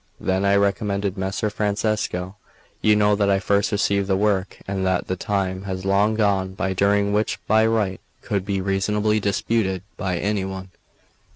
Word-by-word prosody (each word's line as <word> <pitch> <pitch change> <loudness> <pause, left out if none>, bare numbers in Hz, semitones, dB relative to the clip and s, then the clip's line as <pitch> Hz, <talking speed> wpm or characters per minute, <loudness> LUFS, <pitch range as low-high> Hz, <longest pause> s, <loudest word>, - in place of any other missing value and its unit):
Then 95 +1 0
I 100 0 +4
recommenced: 100 -1 0
"Messer 95 +2 -2
Francesco, 105 -3 -1 0.5
you 105 -1 +4
know 105 0 +3
that 100 -1 +1
I 100 - +4
first 100 +2 +1
received 100 -1 +1
the 95 - +2
work, 100 -2 0
and 95 -1 -2
that 95 -1 +1
the 95 - -2
time 95 -1 -2
has 95 -1 -4
long 100 +3 +2
gone 95 -3 +1
by 95 0 -1
during 100 +2 +2
which 105 +1 0
my 110 0 +4
right 105 -5 0 0.2
could 100 -3 -1
be 100 -1 -2
reasonably 105 +3 +1
disputed 100 -2 0
by 95 -3 -2
any 100 +2 -1
one. 95 -1 -6
100 Hz, 170 wpm, -22 LUFS, 95-105 Hz, 0.5 s, I